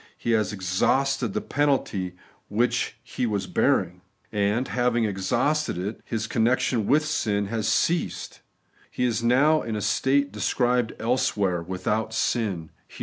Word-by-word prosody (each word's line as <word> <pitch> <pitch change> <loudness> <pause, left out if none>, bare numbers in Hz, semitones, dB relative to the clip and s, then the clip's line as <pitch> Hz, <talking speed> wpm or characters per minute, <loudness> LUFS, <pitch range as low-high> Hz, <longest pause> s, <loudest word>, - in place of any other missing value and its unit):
He 120 - -2
has 110 -2 +2
exhausted 105 +6 0
the - - 0
penalty 130 -11 0 0.3
which 120 +4 0
He 125 - -2
was 100 -3 -1
bearing; - - +1 0.3
and 105 +5 0
having 120 -2 +1
exhausted 120 - 0
it, 100 +5 -4
His 110 -1 -3
connection 115 -1 +1
with 150 +2 +3
sin 105 -10 0
has 110 -1 -1
ceased: 175 +1 0 0.5
He - - -3
is 120 -2 +1
now 140 +7 +4
in 115 -2 -4
the 105 - -2
state 140 +6 +1
described 125 -2 0
elsewhere, 105 -7 +1
'without 105 +5 -2
sin' 105 -8 -1 0.2
(Heb. - - -14
115 Hz, 140 wpm, -25 LUFS, 100-125 Hz, 0.5 s, now